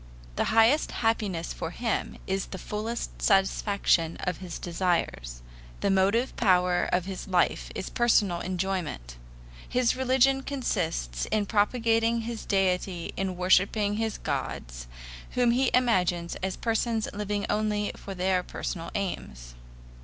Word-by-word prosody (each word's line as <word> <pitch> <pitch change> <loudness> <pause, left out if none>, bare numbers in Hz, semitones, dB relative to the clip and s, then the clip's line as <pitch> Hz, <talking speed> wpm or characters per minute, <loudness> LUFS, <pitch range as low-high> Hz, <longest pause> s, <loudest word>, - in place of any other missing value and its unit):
The - - +1
highest 225 +7 +4 0.2
happiness 200 -7 0
for 165 - -4
him 225 +5 -2
is 190 0 -2
the 190 - -7
fullest 215 +5 -4
satisfaction 195 -4 +2
of 180 -1 -2
his 180 -3 -7
desires. 165 - -2 0.4
The 200 - +2
motive 200 +7 +2
power 180 -4 +3
of 180 -1 +1
his 190 0 -6
life 180 -2 +1
is 190 - -5
personal 210 -7 +3
enjoyment. 180 - -3 0.5
His 250 -1 +2
religion 260 +1 +3
consists 170 - -2
in 215 -1 +1
propitiating 225 +2 +2
his 230 0 -5
deity 185 -3 0
and 195 0 -1
in 180 - -6
worshiping 200 +3 +3
his 220 -1 -1
gods, - - -4 0.5
whom 245 -1 +4
he 255 +1 +2
imagines 180 -9 +2
as 190 0 -3
persons 225 -1 0
living 205 0 -2
only 210 -1 0
for 195 - -8
their 185 0 +1
personal 170 -1 -5
aims. 60 - -4
195 Hz, 130 wpm, -27 LUFS, 180-225 Hz, 0.5 s, highest